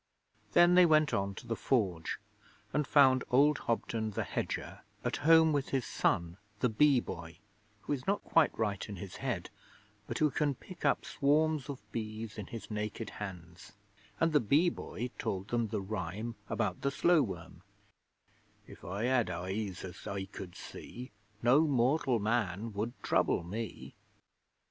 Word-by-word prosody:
Then 175 +6 +7
they 180 -1 +7
went 155 -2 +4
on 100 0 0
to - - -9
the 115 - -2
Forge 95 -7 0 0.6
and 150 -1 +1
found 130 -3 +5
old 140 +3 +4
Hobden 115 -1 -1
the 105 - -2
hedger - - -4 0.2
at - - 0
home 160 +1 +6
with 140 -2 0
his 135 -3 0
son, 85 +1 0 0.2
the 125 - +2
Bee 135 +4 +5
Boy, 85 -6 -7 0.4
who - - -2
is 130 -3 -5
not 200 +1 +1
quite 165 -2 +4
right 105 -3 -1
in 100 - -5
his 95 +1 -8
head, - - -3 0.6
but - - -3
who 150 -2 +3
can 145 0 +1
pick 175 +6 -12
up - - +2
swarms 150 0 +1
of 140 - -4
bees 110 -1 -5
in 100 - -6
his 115 -1 -8
naked 105 +1 -4
hands; 90 -3 -8 0.5
and 165 -1 +2
the 150 - +6
Bee 145 - +3
Boy 125 -6 -5
told 95 +1 -3
them 120 -1 +1
the 105 -1 -2
rhyme 105 +3 -4 0.2
about 95 -3 -1
the 140 - +1
slow 165 +3 +4
worm: 90 -6 -5 1.0
'If - - -14
I 100 +4 -4
had 125 -5 +2
eyes 95 +2 -3
as 90 -2 -9
I 100 -1 -3
could 95 -2 -9
see, 125 0 -9 0.3
No 125 +5 +6
mortal 130 0 +2
man 110 -1 -1
would 110 +4 -2
trouble - - +2
me.' 110 +6 -6
115 Hz, 165 wpm, -32 LUFS, 100-140 Hz, 1.0 s, Then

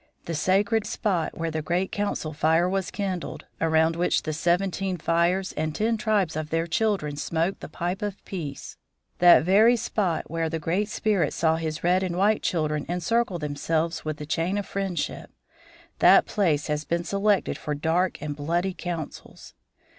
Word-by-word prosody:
The 165 - -4
sacred 200 +6 +1
spot 190 -6 -1
where 165 0 -2
the 155 0 -2
great 175 +5 -1
council 200 -6 -2
fire 160 +3 +2
was 190 0 -1
kindled, 190 -4 -4 0.2
around 160 0 +3
which 175 +1 +1
the 155 - -3
Seventeen 180 +3 0
Fires 170 +3 +1
and 155 0 -2
ten 225 +2 +1
tribes 210 -7 0
of 155 -1 -3
their 165 +1 0
children 170 -4 0
smoked 165 +5 -1
the - - -8
pipe 175 +2 -3
of 205 -2 -5
peace 155 -8 -6 0.4
that 175 -3 +7
very 210 +7 +5
spot 205 -7 -1
where 165 0 -2
the 165 - -2
Great 180 +7 -1
Spirit 205 -7 0
saw 160 -1 +2
his 160 -1 -4
red 180 +2 +3
and 180 -2 -2
white 210 +3 +3
children 155 -4 -1
encircle 180 +3 0
themselves 160 +2 -2
with 155 -1 -3
the 150 - -6
chain 165 +6 -1
of 205 - -2
friendship 195 -3 -3 0.7
that - - +7
place 160 -8 +1
has 150 0 -2
been 170 +2 -1
selected 200 +3 +1
for 150 - -4
dark 165 +5 0
and 150 -1 -3
bloody 170 +6 -1
councils. 170 -4 -7
170 Hz, 170 wpm, -25 LUFS, 160-195 Hz, 0.7 s, that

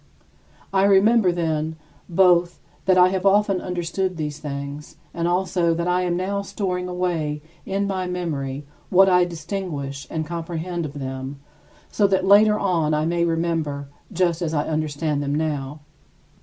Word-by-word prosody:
I 195 0 +4
remember, 200 0 +5
then, 160 -2 -1 0.3
both 175 -1 +3 0.3
that 185 -1 +4
I 180 0 +7
have 190 -1 -2
often 200 -1 +3
understood 180 +1 -2
these 150 -1 -4
things 140 0 -6 0.2
and 170 0 -1
also 175 -1 +1
that 170 +1 -2
I 180 +1 +2
am 175 -1 0
now 200 +2 -1
storing 190 -2 -3
away 170 -5 -2 0.2
in 195 +1 0
my 190 -2 -2
memory 150 -6 -3 0.2
what 190 +1 +6
I 180 -1 +5
distinguish 160 -5 -5
and 160 -1 -3
comprehend 170 +1 -4
of 140 - -10
them 135 0 -5 0.5
so 205 - +3
that 190 -1 +1
later 210 +2 +6
on 165 -7 +1
I 150 +1 0
may 170 +1 +1
remember 165 -4 -1 0.2
just 175 -2 +1
as 160 -2 -1
I 145 - +1
understand 155 -1 -1
them 145 0 -1
now. 150 -2 -2
170 Hz, 155 wpm, -23 LUFS, 150-185 Hz, 0.5 s, I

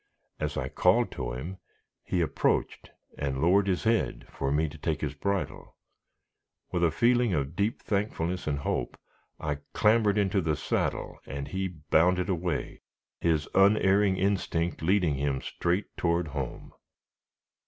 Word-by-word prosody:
As - - -2
I - - -1
called - - +3
to - - -4
him, 85 +10 -6 0.4
he 90 - 0
approached, 80 - 0 0.3
and 70 -2 -2
lowered 95 +6 +4
his 90 -2 0
head 115 0 +1
for 70 0 -2
me 75 +2 +2
to 80 +2 -9
take 80 0 -1
his 75 -2 -2
bridle. 100 +6 -3 1.0
With 90 -1 0
a 85 - +5
feeling 120 +4 +3
of 70 +2 -2
deep 105 +4 -1
thankfulness 95 -4 -1
and 75 -2 0
hope, 65 -3 -2 0.4
I 75 -2 -2
clambered 105 -1 +3
into 100 -1 +2
the 80 -2 0
saddle, - - -2
and 70 0 -5
he 95 0 -1
bounded 90 +2 +2
away, 85 -4 -2 0.4
his 80 -3 +1
unerring 100 0 +4
instinct 95 -3 0
leading 90 -2 +2
him 70 -1 0
straight 90 +8 -2
toward 85 -1 +1
home. 70 -3 -5
85 Hz, 145 wpm, -28 LUFS, 75-100 Hz, 1.0 s, a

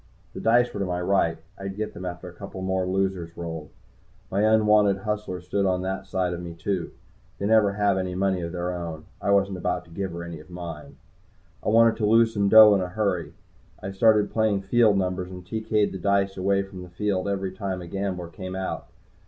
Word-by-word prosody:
The - - -7
dice 120 +2 +3
were 100 - -5
to 100 - 0
my 90 -1 -2
right 90 -3 +1 0.2
I'd 95 0 -5
get 105 +1 -4
them 90 - -7
after 90 0 -6
a 90 - -10
couple 95 +1 -8
more 95 -1 0
losers 95 -3 -1
rolled. 80 -3 -6 0.6
My 100 - +1
unwanted 105 -2 +4
hustler 105 -4 -3
stood 95 +2 0
on 90 -1 0
that 95 +1 -4
side 90 -2 -1
of 85 - -5
me, 85 -1 -7
too. 90 +1 -2 0.5
They 100 - -3
never 105 -2 +4
have 100 -2 +2
any 90 -1 -3
money 95 -1 +1
of 85 0 -4
their 90 0 -3
own. 85 -3 -6 0.2
I - - -1
wasn't 100 -1 +2
about 90 0 -2
to 80 - -19
give 95 +2 -4
her 85 0 -5
any 85 -2 -7
of 80 - -15
mine. 85 -4 -8 0.7
I - - 0
wanted 115 +1 +5
to 105 - +1
lose 115 +1 +4
some 100 -1 +1
dough 110 -1 +9
in 100 - +2
a 90 - -2
hurry. 90 -5 -2 0.5
I 95 - -4
started 105 +1 +3
playing 110 -3 +1
field 110 0 +4
numbers, 90 -1 -1
and 90 -1 -9
TK'd 110 +1 0
the 95 - -6
dice 100 +1 +1
away 100 +1 +1
from 95 -1 -10
the 90 - -10
field 95 +1 -1
every 95 -1 -2
time 95 0 -4
a 90 - -8
gambler 90 -1 -3
came 95 +1 -7
out. 95 0 -4
95 Hz, 220 wpm, -25 LUFS, 90-100 Hz, 0.7 s, dough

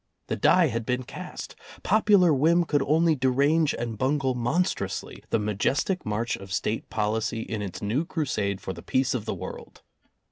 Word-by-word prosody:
The - - 0
die 175 -4 +4
had 115 -1 -2
been 125 +2 -1
cast. - - -8 0.3
Popular 200 -5 +4
whim 165 +5 +4
could 145 -2 +1
only 160 +2 +3
derange 140 +4 +2
and 115 -3 -4
bungle 135 0 +1
monstrously 120 - -2
the - - +2
majestic 110 - -1
march 110 +3 -1
of 95 0 -11
State 105 +3 -2
policy 110 +1 -1
in 110 -2 -4
its 100 -1 -6
new 115 +10 0
crusade 110 - -2
for 95 - -4
the - - -10
peace 130 0 0
of 115 -4 -3
the - - -2
world. - - -9
130 Hz, 170 wpm, -26 LUFS, 110-155 Hz, 0.3 s, die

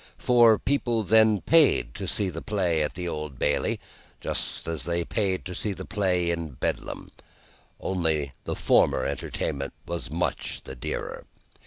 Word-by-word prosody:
For, 120 -3 +6
people 120 -4 0
then 110 0 +5
paid 145 - +4
to - - -5
see 100 -2 0
the 80 -1 -6
play 90 -6 +1
at 75 - -1
the 90 -1 -4
Old 75 -5 -4
Bailey, 75 +2 +1 0.4
just - - -3
as 80 -4 -3
they 85 0 0
paid 95 -4 -1
to 90 - -5
see 100 +3 -2
the 95 0 -7
play 90 -5 +1
in 85 -4 -3
Bedlam - - -3 0.7
only 80 -6 0
the - - -2
former - - +3
entertainment 70 0 -3
was 85 0 -4
much 85 +3 -2
the 65 - -8
dearer. - - -4
90 Hz, 155 wpm, -26 LUFS, 80-105 Hz, 0.7 s, For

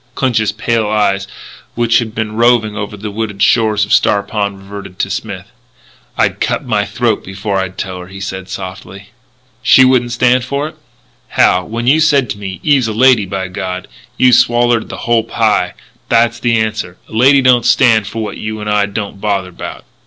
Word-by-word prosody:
Clinch's 115 -5 +1
pale 115 0 -1
eyes, 100 -2 +1 0.5
which 115 0 +3
had 110 -2 -5
been 110 -1 -2
roving 115 -1 +2
over 105 0 -5
the 105 +1 -6
wooded 105 -2 -3
shores 110 -2 +3
of - - -1
Star 100 -1 +3
Pond, 100 -1 -3
reverted 95 -1 -10
to - - -2
Smith. - - -6 0.7
"I'd - - +1
cut - - -1
my - - 0
throat - - -1
before 95 +1 -3
I'd 95 -1 -4
tell 95 -1 -5
her," 90 - -9
he 95 +1 -10
said 95 -1 -6
softly. 95 +1 -8 0.5
"She 130 +1 +6
wouldn't 125 -2 +2
stand 125 +1 +2
for 140 +3 -2
it?" 155 - -11 0.5
"Hal, 90 0 +2
when 115 +2 -4
you 140 +5 +4
said 140 -7 +2
to 100 - -6
me, 95 -2 -6
'Eve's 140 -6 +3
a 110 - -3
lady, 120 -3 +4
by 95 0 -3
God!' 90 -1 -5 0.3
you 125 -1 +4
swallered 120 -1 +3
the - - -7
hull 115 -1 +3
pie. 110 -7 0 0.3
That's 115 0 +2
the 115 0 +1
answer. 110 -5 -2
A - - -20
lady 135 +5 +4
don't 125 -2 +4
stand 115 -6 +3
for 115 +2 -4
what 105 - -6
you 110 0 -5
and 105 - -6
I 105 -1 +2
don't 100 -1 -6
bother 100 -3 -1
about." 90 - -9
110 Hz, 190 wpm, -14 LUFS, 100-120 Hz, 0.7 s, She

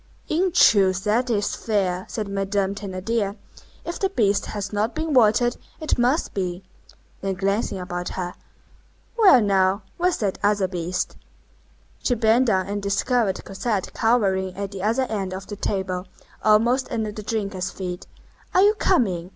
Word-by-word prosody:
"In 360 +4 +1
truth, 195 - +4
that 235 +4 +1
is 205 -3 0
fair!" 190 -4 -1
said 215 -2 -3
Madame 195 0 -1
Thénardier, 200 +1 -3 0.5
"if 340 - -4
the 390 - +1
beast 205 - +1
has 205 -1 -5
not 210 +3 0
been 315 -1 -2
watered, 240 0 +4 0.2
it 310 -5 -1
must 250 +6 +1
be." 180 -1 -3 0.6
Then 195 -1 -2
glancing 195 +2 -1
about 180 -1 -4
her:— 180 -1 -3 0.8
"Well, 405 - +7
now! 195 -1 +2
Where's 360 0 +1
that 200 -3 -2
other 205 -2 +2
beast?" 180 -1 -3 0.8
She 245 - +1
bent 230 +3 +3
down 190 -4 +2
and 205 +1 -3
discovered 200 +1 0
Cosette 195 0 -2
cowering 190 -5 +1
at 200 -1 -4
the 195 -2 -6
other 225 +6 +1
end 200 -6 -3
of 190 0 -7
the 205 - -7
table, 190 -2 -3 0.4
almost 235 +5 +3
under 220 -2 -2
the 215 - -7
drinkers' 200 -4 -2
feet. 180 -2 -6 0.5
"Are 370 - +6
you 415 +1 +6
coming?" 185 - +1
205 Hz, 155 wpm, -23 LUFS, 190-235 Hz, 0.8 s, Well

